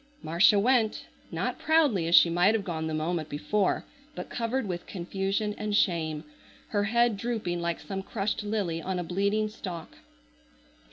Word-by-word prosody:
Marcia 170 +7 +5
went. 225 0 +2 0.3
Not - - -2
proudly 290 - +3
as 170 - +5
she - - +8
might 175 +6 +3
have 215 - -1
gone 160 -4 -3
the 160 - -3
moment 155 0 -2
before, 190 +7 0 0.3
but - - -7
covered 235 +2 -1
with 175 -2 -5
confusion 195 +3 -2
and 210 -1 -1
shame, 160 -6 +1 0.5
her 205 -1 +1
head 235 0 +2
drooping 210 -6 -2
like 170 -1 -2
some 195 -1 -5
crushed 200 +2 -2
lily 205 -6 -2
on 185 +2 -3
a 180 - -2
bleeding 200 +5 0
stalk. 180 -6 -8
195 Hz, 160 wpm, -28 LUFS, 170-215 Hz, 0.5 s, she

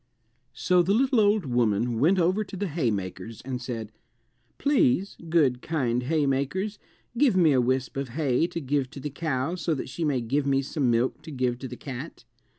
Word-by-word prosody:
So 180 -1 +3
the 190 +4 +2
little 260 0 +3
old 205 -3 +3
woman 120 -2 +1
went 170 +9 +4
over 185 +4 +2
to 195 -1 -9
the 200 +2 -2
haymakers 115 - -3
and 125 -1 -5
said, 115 -3 -5 0.7
"Please, 200 - +2
good 140 -7 +3
kind 125 -7 0
haymakers, 150 +8 -1 0.4
give 265 -9 +4
me 165 -4 +5
a 130 -2 +4
wisp 130 +2 -1
of 135 -2 -3
hay 145 +3 +1
to 170 - -5
give 140 -2 -1
to 145 - -9
the 145 +2 -5
cow 140 0 -2
so 165 -2 -1
that 130 - -5
she 165 - -4
may 145 -4 +1
give 135 +5 -1
me 135 0 +2
some 135 -1 0
milk 120 +2 +1
to - - -11
give 125 -4 -1
to 130 - -5
the 125 0 -8
cat." 130 -1 -8
140 Hz, 190 wpm, -26 LUFS, 125-170 Hz, 0.7 s, me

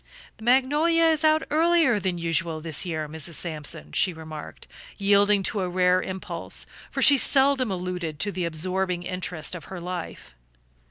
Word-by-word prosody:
"The - - -13
magnolia 295 +7 +3
is 320 -1 +3
out 310 0 +4
earlier 320 -7 +3
than 185 -2 -2
usual 165 -1 0
this 160 +2 -1
year, 155 -3 -3
Mrs. 160 +2 -2
Sampson," 150 - -3
she 180 - +2
remarked, 155 -2 -9 0.3
yielding 200 0 +3
to 210 - -1
a 180 - -2
rare 180 0 +2
impulse, 190 0 -5 0.2
for - - -1
she 280 -2 +7
seldom 270 -3 +3
alluded 180 -4 -4
to 205 - -1
the 185 -3 -3
absorbing 180 +2 -2
interest 175 -3 -4
of 180 - -7
her 190 -2 -8
life. 175 - -7
185 Hz, 160 wpm, -25 LUFS, 165-240 Hz, 0.3 s, she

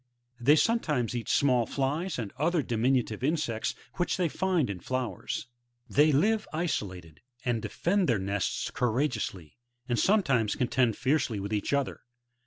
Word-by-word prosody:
They 140 +5 +5
sometimes 150 - +1
eat 120 - -4
small 125 -4 +3
flies 150 +6 -1
and 110 -5 -4
other 165 +1 +2
diminutive 120 -1 0
insects 140 -7 0 0.2
which 175 - 0
they 180 -3 +1
find 180 -3 +1
in 100 -3 -5
flowers. 130 +3 -3 0.4
They 150 +2 +4
live 210 +10 +2
isolated, 95 - -3 0.2
and 120 -3 0
defend 175 - 0
their 115 - +3
nests 100 +1 -2
courageously, 120 - -2 0.3
and 120 -2 0
some 205 +1 +4
times 115 - +1
contend 125 -2 +1
fiercely 135 -5 +1
with 100 +2 -4
each 105 - -1
other. 140 -1 -1
130 Hz, 145 wpm, -29 LUFS, 110-155 Hz, 0.4 s, They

